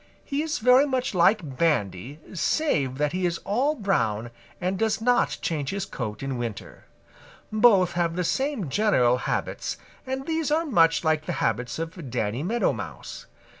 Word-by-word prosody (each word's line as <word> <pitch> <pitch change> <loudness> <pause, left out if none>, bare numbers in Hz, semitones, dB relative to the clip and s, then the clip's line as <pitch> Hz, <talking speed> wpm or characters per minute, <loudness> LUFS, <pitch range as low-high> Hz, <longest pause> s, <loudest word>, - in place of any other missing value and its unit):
He 280 +1 -1
is 310 -1 -2
very 250 +5 +5
much 255 -4 -1
like 170 - +2
Bandy 135 - 0
save 150 - 0
that 150 0 0
he 185 0 0
is 170 -1 -2
all 260 +9 +1
brown 120 - -1 0.3
and 185 +1 -2
does 220 -1 +1
not 245 +2 +2
change 145 -4 -1
his 195 -1 -2
coat 110 - -5
in 135 -2 -3
winter. 115 -4 -6 0.7
Both 210 -5 +5
have 170 -1 -1
the 180 - 0
same 265 - -1
general 130 - +3
habits, - - -2 0.3
and 265 +1 -3
these 320 -1 -1
are 320 +3 +1
much 165 - +3
like 155 -1 +1
the - - -1
habits 125 0 -1
of 165 -3 -6
Danny 110 +2 -2
Meadow 225 +9 +1
Mouse. - - -8
175 Hz, 165 wpm, -25 LUFS, -, 0.7 s, very